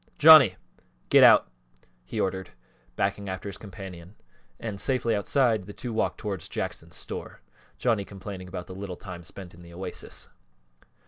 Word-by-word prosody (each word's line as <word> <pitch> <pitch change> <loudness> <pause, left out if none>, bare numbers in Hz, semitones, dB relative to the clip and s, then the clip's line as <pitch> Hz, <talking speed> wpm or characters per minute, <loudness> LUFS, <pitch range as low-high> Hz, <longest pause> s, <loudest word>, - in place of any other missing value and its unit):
Johnny, 150 - +9 0.5
get - - +7
out," - - +8 0.6
he - - -5
ordered, 95 -1 -1 0.5
backing 100 +4 -1
after 95 +2 -5
his 100 -1 -7
companion, 95 -2 -10 0.4
and 105 -4 -4
safely 125 -4 +1
outside, 110 0 +2
the 105 - -9
two 120 +1 -6
walked 110 - 0
towards 100 -6 -5
Jackson's - - -4
store, - - -7 0.4
Johnny 115 -5 +1
complaining 95 -1 -8
about 90 -1 -6
the 95 - -9
little 95 -1 -6
time 90 -4 -9
spent 90 +1 -9
in 85 - -15
the 85 0 -13
Oasis. 90 0 -6
95 Hz, 150 wpm, -27 LUFS, 90-110 Hz, 0.6 s, Johnny